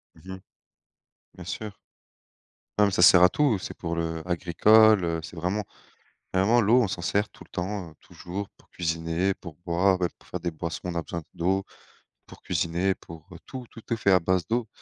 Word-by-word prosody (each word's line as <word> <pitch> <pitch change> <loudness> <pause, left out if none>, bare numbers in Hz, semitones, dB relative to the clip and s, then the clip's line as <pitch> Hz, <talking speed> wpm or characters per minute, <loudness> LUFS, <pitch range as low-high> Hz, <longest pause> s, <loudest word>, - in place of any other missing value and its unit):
Mmh 95 +4 -10
mh. - - -12 1.0
Bien 90 - -10
sûr. 105 +3 -5 1.1
Ah 105 - +7
mais 100 - +1
ça 90 - +1
sert 90 -1 +8
à 90 - +8
tout, 140 -9 +2
c'est - - -7
pour 85 0 -4
le 80 -1 -2
agricole, 100 +4 +5
heu, 85 -1 -1
c'est 85 - -9
vraiment, 90 +6 -2 0.7
vraiment 110 +6 +4
l'eau, 120 +4 +4
on 105 - 0
s'en 85 - -4
sert 105 +4 0
tout - - -15
le - - -25
temps, 90 -1 -4
heu, - - -18
toujours 95 +3 -7
pour - - -26
cuisiner, 85 +3 -1
pour 85 -4 -11
boire, 95 +2 +2
même 90 - +2
pour - - -22
faire 90 - -5
des 85 - -2
boissons, 80 +1 -5
on 90 - -3
a 85 - 0
besoin 85 0 -6
d'eau, 95 +3 0 0.6
pour - - -14
cuisiner, 85 +3 0
pour 85 +1 -13 0.2
tout, 130 -2 -8
tout 115 - -12
est - - +2
fait 100 -3 +2
à 90 - +5
base 90 +1 0
d'eau, 115 -1 -1
90 Hz, 205 wpm, -26 LUFS, 85-100 Hz, 1.1 s, sert